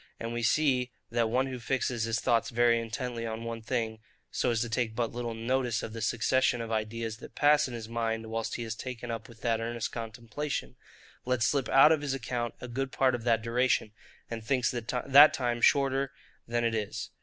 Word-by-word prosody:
And 115 +1 -4
we 120 - -2
see, 125 +1 +2 0.2
that 115 -1 +1
one 130 +3 +2
who 130 -2 -5
fixes 120 -1 -1
his 115 0 0
thoughts 120 0 +1
very 120 -1 +3
intently 115 +1 -4
on 110 +1 -5
one 115 0 -5
thing, 115 -2 -2 0.3
so - - 0
as 115 -2 +1
to 120 - -1
take 115 -1 -1
but 115 -1 -1
little 120 -1 -4
notice 120 0 0
of 110 - -6
the 115 - -6
succession 125 +2 +2
of 115 -1 -5
ideas 110 0 -2
that - - -12
pass 150 0 +4
in 125 - -6
his 115 -2 -6
mind 115 -1 -2
whilst 115 0 -2
he 120 - -3
is 110 -1 -3
taken 120 0 -6
up 115 0 -6
with 115 0 -15
that 115 -1 0
earnest 115 0 -3
contemplation, 115 - -5 0.5
lets 125 -2 +1
slip 140 -1 +1
out 135 +3 +7
of 155 -2 +3
his 140 -2 -1
account 120 -1 -3
a 125 - -7
good 130 +2 -3
part 130 -1 +2
of 120 -1 -4
that 115 -2 +2
duration, 120 -2 +1 0.4
and 115 -1 -6
thinks 125 0 +1
that 130 +5 +5
time 120 -2 -1
shorter 135 -1 +3 0.4
than 120 0 0
it 115 -1 +1
is. 105 -2 -3
120 Hz, 210 wpm, -29 LUFS, 115-130 Hz, 0.5 s, out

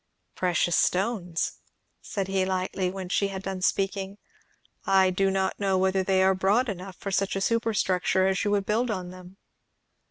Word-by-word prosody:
"Precious 175 -1 +1
stones!" 185 -3 0 0.4
said 195 -3 -3
he 195 -1 +1
lightly, 185 0 -1
when 190 0 -6
she 200 +2 +1
had 195 -1 -6
done 190 -1 -4
speaking. 195 +1 -1 0.7
"I 190 -2 +4
do 195 +1 +1
not 190 0 -1
know 195 -2 +1
whether 190 0 +2
they 190 0 +2
are 190 0 +4
broad 200 +7 +2
enough 190 -1 -6
for 195 - -6
such 195 +1 0
a - - 0
superstructure 195 -5 +1
as 190 0 +1
you 205 - 0
would 205 -1 +1
build 230 +4 0
on 185 -4 -3
them." 185 +1 -13
190 Hz, 170 wpm, -26 LUFS, 185-195 Hz, 0.7 s, I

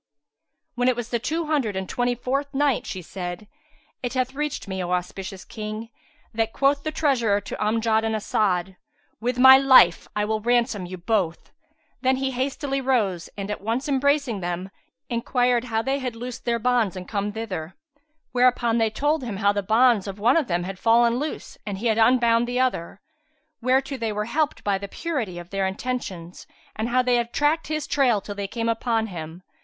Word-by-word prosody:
When 245 +1 0
it 255 - +3
was 240 -1 -5
the 235 - 0
Two 320 +7 -2
Hundred 280 -10 0
and 190 0 -3
Twenty 245 0 0
fourth 275 +3 -2
Night, 285 -3 +1
She 185 -2 -5
said, 180 +3 -6 0.5
It 245 +1 -3
hath 255 0 0
reached 295 -4 -3
me, 190 -1 -3
O 175 - -4
auspicious 190 +2 -4
King, 215 +1 -6 0.4
that 225 0 -1
quoth 280 +1 +2
the 310 - -3
treasurer 250 -10 +2
to - - -6
Amjad 220 +1 +2
and 220 0 0
As'ad, 190 -3 0 0.4
"With 245 +2 -1
my 265 +1 +9
life 260 -11 +6
will 210 +1 0
I - - -14
ransom 235 -5 +1
you 185 +1 -7
both!" 180 -2 -1 0.5
Then 260 0 +3
he 265 0 -1
hastily 275 +2 -2
rose 215 -10 0
and, 200 +1 -4
at 210 - -4
once 230 +7 -2
embracing 280 -4 +1
them, 175 +1 -4 0.4
enquired 245 0 +1
how 225 -2 -1
they 270 +2 0
had 250 -3 -4
loosed 245 +1 -7
their 235 -1 +1
bonds 230 -5 +1
and 180 -1 -7
come 205 0 -2
thither; 185 -7 -5 0.6
whereupon 245 -2 +3
they 225 -1 +3
told 290 +6 0
him 225 -5 -4
how 200 0 +3
the 205 - -1
bonds 220 0 +3
of 195 0 -5
one 230 +5 +3
of 320 -6 +2
them 175 -2 0
had 190 +1 -6
fallen 235 +1 +4
loose 300 +2 -5
and 205 -3 -4
he 215 - -6
had 225 -1 +2
unbound 235 0 +4
the 245 +1 -1
other, 220 -8 -1 0.6
whereto 265 +2 +1
they 225 -3 -2
were 210 0 -2
helped 300 +5 -1
by 200 -2 +1
the 200 - -6
purity 245 - -3
of 175 +1 -9
their 195 -1 0
intentions, 190 -5 -5 0.3
and 220 +2 -2
how 255 +1 +3
they 250 -1 +3
had 235 0 -2
tracked 300 +4 +1
his 310 -1 -2
trail 265 -7 +2
till 205 - -7
they 200 -1 -4
came 230 +2 -3
upon 230 0 0
him. 170 -3 -8
230 Hz, 195 wpm, -24 LUFS, 200-255 Hz, 0.6 s, my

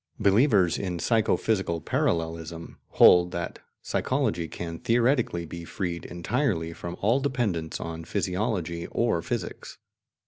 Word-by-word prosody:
Believers 100 - +4
in 90 -3 -3
psycho 110 +5 +2
physical 95 -6 0
parallelism 80 +1 -2
hold 90 0 +7
that 85 - -4 0.2
psychology 85 0 0
can 85 0 -6
theoretically 120 -7 +1
be 85 +1 -8
freed 85 0 -4
entirely 90 - -1
from 85 +1 -7
all 115 +7 +3
dependence 115 - -1
on 80 0 -6
physiology 90 -3 -2
or - - 0
physics. - - -5
90 Hz, 115 wpm, -27 LUFS, 85-110 Hz, 0.2 s, hold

